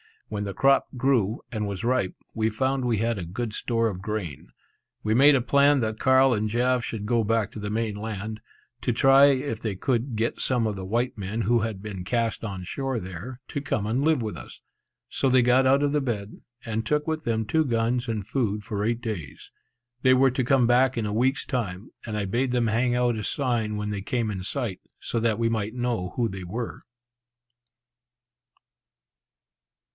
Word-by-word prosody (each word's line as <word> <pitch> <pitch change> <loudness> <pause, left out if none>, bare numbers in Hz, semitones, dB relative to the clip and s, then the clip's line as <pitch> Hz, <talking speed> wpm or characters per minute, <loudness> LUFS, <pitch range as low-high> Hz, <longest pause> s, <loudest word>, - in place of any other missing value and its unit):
When 105 -1 -3
the 100 - -4
crop 135 +5 +3
grew, 120 -5 +1
and 105 -3 -2
was 100 0 -4
ripe, 120 -6 +1 0.2
we 110 0 +1
found 130 +4 0
we 120 -3 +1
had 115 0 0
a 90 - -4
good 110 +6 -4
store 115 0 0
of 95 -4 -4
grain. 100 - -4 0.6
We 110 - +1
made 140 +5 +7
a 130 - +2
plan 140 +2 +4
that 110 -1 -2
Carl 130 0 +5
and 110 -1 0
Jaf 125 +2 +1
should 110 -3 -4
go 115 +1 +2
back 115 -1 0
to - - -8
the 105 0 -4
main 110 0 -1
land, 110 0 -5 0.4
to 120 - 0
try 135 +3 +6
if 135 -4 +1
they 110 -4 -3
could 120 +3 -1
get 115 +2 -1
some 125 -3 +1
of 105 -2 -2
the 95 - -5
white 120 +5 -1
men 105 +3 -3
who 115 +3 +3
had 110 -3 -3
been 95 -4 -6
cast 115 +2 -1
on 95 -4 -5
shore 135 +7 -3
there, 95 +8 -8
to 140 - -3
come 105 -7 -1
and 120 +6 0
live 155 -5 +2
with 105 -6 -4
us; - - -11 0.5
so 135 - +1
they 130 -1 +5
got 130 +2 +4
out 135 +2 +4
the 150 0 +1
boat, 105 -6 -3 0.4
and 110 -1 -2
took 150 +4 +1
with 160 -1 -2
them 110 -1 0
two 160 +8 +2
guns 120 0 0
and 110 -4 -2
food 105 -4 -1
for 105 -1 -3
eight 115 +1 0
days. 95 - -6 0.5
They 130 -1 +5
were 130 0 +4
to 130 0 -1
come 130 -1 +4
back 125 +1 +3
in 115 - 0
a 105 - -2
week's 130 +5 +1
time, 100 -6 -3
and 110 -2 -3
I 105 - -1
bade 120 +6 0
them 120 -2 +2
hang 120 +3 +1
out 120 -2 +1
a 110 - -4
sign 120 -6 -1
when 105 0 -3
they 100 -1 -3
came 115 +1 -1
in 95 -2 -5
sight, 100 -1 -2 0.2
so 115 - -2
that 110 -2 +1
we 115 0 +1
might 110 0 -2
know 120 -7 -2
who 120 -2 +1
they 95 -3 -7
were. 115 +7 -5
115 Hz, 205 wpm, -26 LUFS, 105-125 Hz, 0.6 s, made